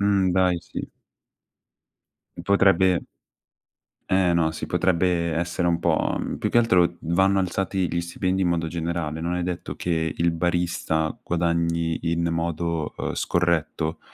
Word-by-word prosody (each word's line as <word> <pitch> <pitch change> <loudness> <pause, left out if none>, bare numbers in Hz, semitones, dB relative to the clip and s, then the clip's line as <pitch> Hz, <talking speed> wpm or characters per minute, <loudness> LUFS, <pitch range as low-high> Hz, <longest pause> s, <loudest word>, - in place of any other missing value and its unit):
Mh, 100 -2 +2
dai 90 -1 +2
sì. - - -7 1.5
Potrebbe 95 -2 +4 1.1
Eh 95 -2 +3
no, 80 -2 +2
si 80 - -6
potrebbe 85 -2 +1
essere 85 +1 -1
un 85 -1 +1
po' - - +1
mhmm, - - -3
più - - -2
che - - +4
altro 90 -7 +3
vanno 95 +4 +2
alzati 95 0 -1
gli 85 - 0
stipendi 95 +2 -1
in 90 - +2
modo 85 -1 0
generale. 80 -1 -3
Non 85 +1 -1
è 90 - -1
detto 90 -1 -4
che 80 -3 -1
il 85 0 +2
barista 85 -2 -1
guadagni 85 -1 0
in 85 0 0
modo, 85 -1 -2
ehm, - - -3
scorretto, 85 -2 0
85 Hz, 140 wpm, -24 LUFS, 85-90 Hz, 1.5 s, Potrebbe